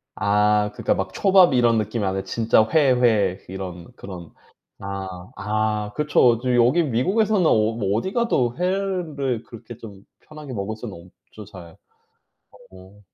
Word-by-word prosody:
아. 105 0 +2
그러니까 - - 0
막 - - -4
초밥 190 -5 +4
이런 120 -2 +3
느낌이 110 +1 -2
아니라 95 0 -2
진짜 110 -1 +2
회, 145 -4 +4
회 105 -6 +2
이런 95 +1 -8
그런. 90 -6 -10 0.5
아. 95 -2 -7
아 105 +1 -2
그쵸. 125 -6 +3
저 125 0 0
여기 125 +8 +3
미국에서는 190 - +1
어 - - +4 0.2
뭐 100 -2 -1
어디가도 190 - 0
회를 175 - -2
그렇게 115 0 -12
좀 100 -4 -12 0.2
편하게 150 -3 -10
먹을 105 0 -4
수는 95 -6 -10 0.2
없죠 105 - -11
잘. 90 -5 -13 1.0
어. 95 +2 -16
110 Hz, 270 characters per minute, -22 LUFS, 100-135 Hz, 1.0 s, 초밥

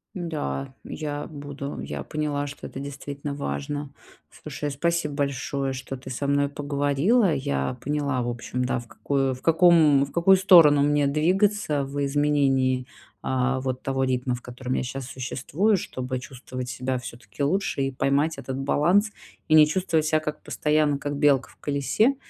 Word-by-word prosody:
Да, 150 - -4
я 145 -1 -5
буду. 145 -2 -7
Я - - -5
поняла, 145 -2 -2
что 140 0 -9
это - - -8
действительно 140 +1 -6
важно. 140 - -4 0.4
Слушай, 150 - -5
а, - - -5
спасибо 170 +1 -1
большое, 140 -1 -2
что 130 +1 -6
ты 130 +1 -10
со 130 +2 -3
мной 140 0 +2
поговорила. 145 - +1
Я 70 - -2
поняла, 145 -2 -1
в 120 - -2
общем, 120 +1 -3
да, 125 - 0
в 120 - -12
какую, 135 +1 -1
в 125 - -14
каком, 160 -4 +5
в 140 - -13
какую 190 +3 +5
сторону 170 -6 +7
мне 145 0 +3
двигаться 170 +1 +1
в 140 +1 -3
изменении, 135 -3 +1 0.3
а, 130 0 0
вот, 130 -1 -3
того 135 0 0
ритма, 125 0 0
в 125 - -9
котором 125 +1 -5
я - - 0
сейчас 130 +1 -5
существую, 140 - 0
чтобы 130 -5 -4
чувствовать 130 0 -7
себя 130 +1 -2
всё-таки 120 0 -7
лучше 175 0 0
и 135 - -1
поймать 140 +4 +1
этот 130 0 -5
баланс, 175 +10 +2 0.4
и - - +4
не 155 -1 +8
чувствовать 165 -1 0
себя 155 0 +2
как 150 -1 -5
постоянно, 150 -1 +1
как 145 +1 -4
белка 140 -2 +3
в - - -21
колесе. 145 - +1
140 Hz, 165 wpm, -25 LUFS, 130-150 Hz, 0.4 s, не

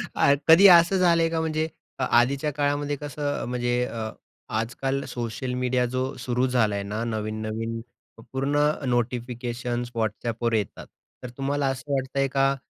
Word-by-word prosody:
अ, 140 - +5
कधी 175 +5 +9
असं 175 +1 +7
झालंय 170 -2 +4
का 165 0 -1
म्हणजे, 160 0 -1 0.3
अ, - - 0
आधीच्या 135 +5 +2
काळामध्ये 145 0 0
कसं 145 0 -3
म्हणजे 120 0 0
अ, 110 -2 -4 0.5
आजकाल 135 +4 -2
सोशल 125 +1 -4
मीडिया 125 0 +1
जो 130 +2 -2
सुरू 125 +1 0
झालाय 110 -5 +1
ना, 105 +3 -3
नवीन-नवीन 110 0 -3 0.5
पूर्ण 135 +2 0 0.3
नोटिफिकेशन्स 120 0 -2
WhatsAppवर 115 +1 -1
येतात. 105 -3 -2 0.4
तर 125 - -5
तुम्हाला 140 0 0
असं 135 +2 -4
वाटतंय 135 0 0
का? 135 0 +2
125 Hz, 135 wpm, -25 LUFS, 120-140 Hz, 0.5 s, कधी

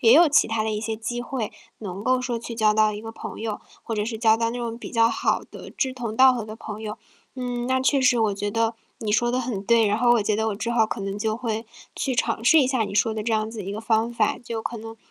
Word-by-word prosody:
也 230 -4 +6
有 320 +4 +7
其 290 - +4
他 225 -1 -1
的 220 - -1
一 210 0 -2
些 220 0 -2
机 235 +2 -4
会 240 -3 -3 0.3
能 195 -1 -6
够 255 +1 +3
说 250 -2 -2
去 235 0 -7
交 215 -2 +3
到 215 0 +3
一 210 - -6
个 225 - -6
朋 - - -8
友， 220 -2 -3 0.2
或 225 - -4
者 210 - 0
是 225 +1 -3
交 220 0 +4
到 230 0 0
那 245 - -5
种 235 -1 -4
比 - - -8
较 230 -1 +4
好 - - 0
的 - - -10
志 260 -2 -1
同 235 -4 -5
道 260 +1 +7
合 240 -3 -3
的 215 0 -8
朋 215 -1 -8
友。 215 -1 -5 0.4
嗯， 245 -2 -3
那 260 0 +1
确 275 +1 +3
实 255 -1 +4
我 215 -2 +2
觉 205 +1 -3
得 225 +2 0 0.2
你 220 -4 -3
说 240 +3 +2
得 255 - +1
很 235 -5 -3
对， 230 0 +4
然 210 +2 +1
后 240 0 +5
我 235 - +3
觉 210 0 0
得 220 +1 0
我 210 - -2
之 230 +3 -3
后 230 -2 +3
可 220 - -5
能 195 +1 -4
就 215 0 -1
会 225 -1 -3 0.3
去 265 - -1
尝 230 -2 -1
试 315 +6 +7
一 265 - +3
下 260 -3 +1
你 200 - -6
说 220 +2 +2
的 215 -1 -4
这 230 - 0
样 215 0 0
子 220 -3 -6
一 195 - -4
个 210 - -5
方 225 +1 +1
法。 220 -3 +1
就 230 -2 -5
可 235 - -4
能， 225 +1 -9
225 Hz, 315 characters per minute, -24 LUFS, 215-240 Hz, 0.4 s, 有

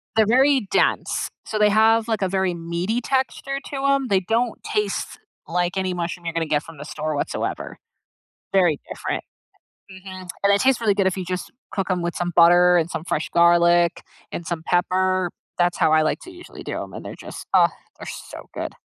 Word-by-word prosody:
they're 220 -1 +5
very 260 0 +4
dense, - - +1 0.2
so 215 - -3
they 210 0 +5
have, 220 +2 +4
like, 220 -3 -1
a 190 - +1
very 190 -1 0
meaty 170 +7 -2
texture 270 +2 -1
to 275 -1 -4
'em. 275 -1 +2
They 195 - +4
don't 225 +5 -1
taste 210 -2 -2 0.3
like 175 +2 -1
any 190 -1 -1
mushroom 175 0 -4
you're 165 - -2
gonna 165 0 0
get 150 -1 0
from 165 -2 -12
the 145 - -8
store 155 0 -3
whatsoever. 145 - -3 0.8
Very 175 -6 +3
different. - - -4 0.7
Mhm, 185 -1 -10
and 200 0 +5
it 200 - +3
tastes 265 -1 +3
really 220 -3 +2
good 195 -1 +2
if 190 - -1
you 185 - -3
just 180 0 -4 0.2
cook 195 -1 -2
'em 180 -1 0
with 175 0 -3
some 175 0 -2
butter, 175 +1 +6
and 165 -1 +1
some 160 - -4
fresh 160 -3 -2
garlic, 170 0 +4 0.3
and 170 - -5
some 170 -2 -3
pepper. 185 +1 +1 0.3
That's 175 0 +2
how - - +3
I 155 - +5
like 155 - 0
to 365 - -11
usually 350 0 -12
do - - -4
'em, - - -8
and - - -7
they're - - -7
just- - - -9
ugh!- - - +5 0.3
they're - - -8
so - - -9
good. - - -5
185 Hz, 205 wpm, -23 LUFS, 170-215 Hz, 0.8 s, butter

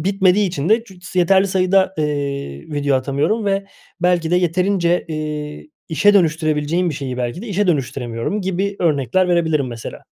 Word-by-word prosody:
bitmediği 195 +2 +2
için 170 -3 -3
de 225 +2 +3
cücs 185 -3 -12
yeterli 190 +2 +4
sayıda, 190 0 +2
eee, 140 - -2
video 145 -2 +1
atamıyorum 140 - 0
ve 195 0 0 0.3
belki 175 -2 +1
de 180 - +3
yeterince, 180 0 +1
eee, 150 - -5 0.2
işe 205 +6 +3
dönüştürebileceğim 160 0 +1
bir - - -4
şeyi 135 -2 -5
belki 125 - -3
de - - -7
işe 205 +1 0
dönüştüremiyorum 135 - -2
gibi 190 +2 -2
örnekler 160 +3 +1
verebilirim 160 -5 +1
mesela. 115 -2 -8
170 Hz, 155 wpm, -19 LUFS, 145-190 Hz, 0.3 s, yeterli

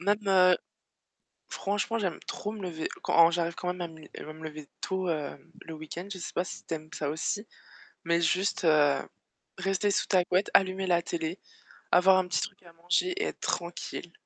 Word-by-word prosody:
Même, 200 +3 +3
heu, 185 -2 +6 0.9
franchement, 205 +3 -1
j'aime 185 -6 -1
trop 210 - -4
me 215 - -8
lever 165 -3 -3
quand 165 0 +6
j'arrive 170 0 0
quand 180 - -4
même 180 - -10
à 175 - -1
me 160 -1 -13
li 155 - -14
à - - -8
me 160 +1 -13
lever 155 -2 -7
tôt, 190 -2 -1
heu, 150 -4 -1 0.3
le 160 - -8
week-end. 155 +4 -7
Je 185 - -6
sais 170 - -6
pas 175 - 0
si - - -8
tu 165 - -3
aimes 155 0 -8
ça 150 - -2
aussi, 205 +7 -2 0.6
mais 170 0 +2
juste 185 +1 +1 0.9
rester 195 +2 +1
sous - - +1
ta 185 -2 +4
couette, 185 +3 +2
allumer 190 0 +4
la 170 -1 +4
télé, 165 +2 -3 0.5
avoir 185 +1 +7
un 185 - +1
petit - - 0
truc 200 -2 -6
à 170 - -15
manger 175 - +1
et 405 +4 -1
être - - -4
tranquille. 170 0 -3
180 Hz, 200 wpm, -29 LUFS, 165-190 Hz, 0.9 s, avoir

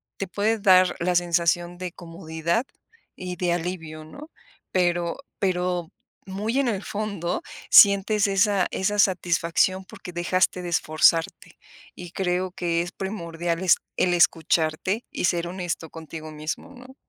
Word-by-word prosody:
te 195 - -4
puede 215 +4 0
dar 185 -3 +5
la 180 +1 0
sensación 175 0 +1
de 180 -1 -5
comodidad 165 +4 -3 0.5
y 180 -1 -5
de 175 0 -1
alivio, 165 -3 -4
¿no? 290 - -12 0.4
Pero 175 -2 0 0.2
pero 180 -3 -1 0.3
muy 210 +7 -2
en 275 - +1
el 205 -4 -2
fondo 200 - -3 0.3
sientes 200 +1 +6
esa 195 -1 +2
esa 205 +2 -1
satisfacción, 180 0 +2
porque 180 - -10
dejaste 180 +1 +1
de 175 - -5
esforzarte. 165 0 +1 0.4
Y 175 -1 -9
creo 185 0 -1
que 170 -2 -1
es 175 - -5
primordial 170 -3 -4
es 185 - +5 0.2
el 180 - +2
escucharte 170 +4 +1
y - - -2
ser 170 -1 0
honesto 175 -3 -4
contigo 155 0 -9
mismo, 155 - -6
¿no? 255 +1 -14
180 Hz, 135 wpm, -24 LUFS, 170-195 Hz, 0.5 s, sientes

